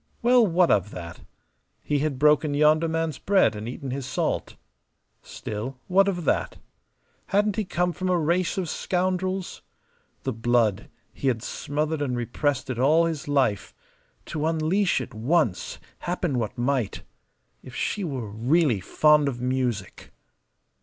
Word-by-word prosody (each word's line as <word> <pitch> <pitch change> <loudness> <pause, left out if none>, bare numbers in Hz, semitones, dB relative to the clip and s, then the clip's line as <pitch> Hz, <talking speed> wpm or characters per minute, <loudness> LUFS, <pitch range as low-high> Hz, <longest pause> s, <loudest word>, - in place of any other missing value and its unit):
Well, 240 -1 +5
what 175 0 +3
of 100 0 +2
that? 85 -4 -8 0.6
He 145 -1 0
had 145 -2 -1
broken 150 +1 +3
yonder 155 +2 +4
man's 160 -3 -2
bread 195 - +3
and 105 +2 -5
eaten 130 +1 -6
his 135 0 -4
salt. 130 - -2 0.7
Still, 115 +5 -6
what 195 +2 +4
of 175 -4 -2
that? - - 0 0.7
Hadn't 205 0 +2
he 215 - -1
come 180 0 0
from 185 +1 -3
a 180 - +3
race 170 +3 0
of 185 -3 -1
scoundrels? 185 +2 -2 0.6
The 130 - -2
blood 115 -2 +1 0.2
he 135 - -3
had 120 -3 0
smothered 150 +3 -2
and 125 -4 -1
repressed 130 +3 -1
it 120 - -4
all 155 +6 +4
his 160 -4 -3
life 135 -8 0 0.5
to 155 0 -2
unleash 165 +2 +1
it 125 - -8
once, 120 - 0 0.2
happen 175 -7 -1
what 115 +2 -3
might. 125 -3 -1 0.6
If 125 - -12
she 205 - -2
were 135 -9 -4
really 120 - +2
fond 150 +9 +3
of 125 -3 -3
music! 125 -2 -2
145 Hz, 145 wpm, -25 LUFS, 125-175 Hz, 0.7 s, Well